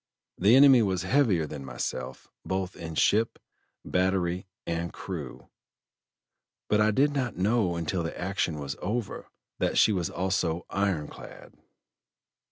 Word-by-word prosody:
The 105 Hz, +6 st, +6 dB
enemy 135 Hz, -2 st, +8 dB
was 95 Hz, -4 st, 0 dB
heavier 110 Hz, -, +2 dB
than 75 Hz, -2 st, -7 dB
myself, 65 Hz, 0 st, -5 dB, 0.2 s
both 95 Hz, -1 st, -3 dB
in 80 Hz, -2 st, -7 dB
ship, 110 Hz, +8 st, +2 dB, 0.5 s
battery, 90 Hz, 0 st, 0 dB, 0.2 s
and 85 Hz, 0 st, -2 dB
crew; -, -, -7 dB, 1.2 s
but 105 Hz, 0 st, +3 dB
I 105 Hz, -, +4 dB
did 140 Hz, +7 st, +2 dB
not 130 Hz, -7 st, -2 dB
know 100 Hz, -2 st, +1 dB
until 85 Hz, +2 st, -2 dB
the 80 Hz, -, -5 dB
action 90 Hz, -3 st, -1 dB
was 70 Hz, -1 st, -5 dB
over 110 Hz, +2 st, -3 dB, 0.3 s
that -, -, 0 dB
she 110 Hz, -, +5 dB
was 90 Hz, -4 st, -1 dB
also 90 Hz, -3 st, -1 dB
iron 95 Hz, -7 st, 0 dB
clad." -, -, -12 dB
95 Hz, 135 wpm, -28 LUFS, 85-105 Hz, 1.2 s, enemy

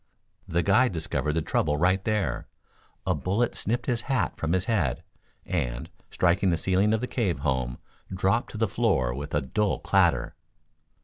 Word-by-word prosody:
The 85 Hz, +1 st, 0 dB
guide 110 Hz, +3 st, +4 dB
discovered 80 Hz, -2 st, -1 dB
the 80 Hz, 0 st, 0 dB
trouble 75 Hz, -1 st, +1 dB
right 90 Hz, +4 st, +2 dB
there. 105 Hz, -, -1 dB, 0.6 s
A -, -, +2 dB
bullet 105 Hz, +6 st, 0 dB
snipped 120 Hz, +3 st, -2 dB
his 120 Hz, -3 st, 0 dB
hat 130 Hz, +1 st, -1 dB
from 80 Hz, +1 st, -1 dB
his 95 Hz, -1 st, +1 dB
head; 90 Hz, -, 0 dB, 0.4 s
and, -, -, -2 dB, 0.2 s
striking 90 Hz, +2 st, +2 dB
the 85 Hz, -, +2 dB
ceiling 95 Hz, +5 st, +2 dB
of 110 Hz, -, -3 dB
the -, -, 0 dB
cave 95 Hz, -, -1 dB
home, 65 Hz, -3 st, -1 dB, 0.3 s
dropped 95 Hz, +5 st, +1 dB
to -, -, -5 dB
the 110 Hz, 0 st, +2 dB
floor 95 Hz, -, +1 dB
with 70 Hz, +4 st, -5 dB
a 75 Hz, -, +2 dB
dull 100 Hz, +10 st, 0 dB
clatter. -, -, +2 dB
95 Hz, 170 wpm, -27 LUFS, 75-110 Hz, 0.6 s, guide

